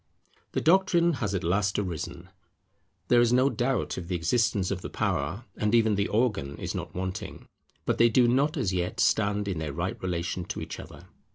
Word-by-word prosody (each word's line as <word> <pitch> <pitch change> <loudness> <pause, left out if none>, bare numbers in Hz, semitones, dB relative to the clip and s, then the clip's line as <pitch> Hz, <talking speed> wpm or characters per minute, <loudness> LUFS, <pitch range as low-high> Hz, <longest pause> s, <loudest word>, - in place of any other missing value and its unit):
The - - 0
Doctrine 170 0 +4
has 100 -3 -1
at 95 - -2
last 100 +3 +1
arisen: 90 -6 -4 0.8
there 120 -1 +6
is 120 -1 +3
no 130 +3 +4
doubt 130 +1 -1
of 85 - -8
the 90 - -2
existence 100 +3 +1
of 95 -2 -2
the - - -6
Power; 85 +12 -2
and 105 +2 +1
even 110 -2 +4
the 100 0 +1
Organ 105 - 0
is - - -4
not - - -6
wanting. 95 0 -5 0.4
But - - 0
they 120 0 +6
do 120 +1 +4
not 140 +6 +2
as 105 -9 0
yet 90 -1 -2
stand 105 -1 +2
in 95 -5 -2
their 75 -3 -4
right 90 +5 -3
relation 90 0 -2
to 100 - -5
each - - -6
other. - - -11
100 Hz, 195 wpm, -27 LUFS, 90-120 Hz, 0.8 s, there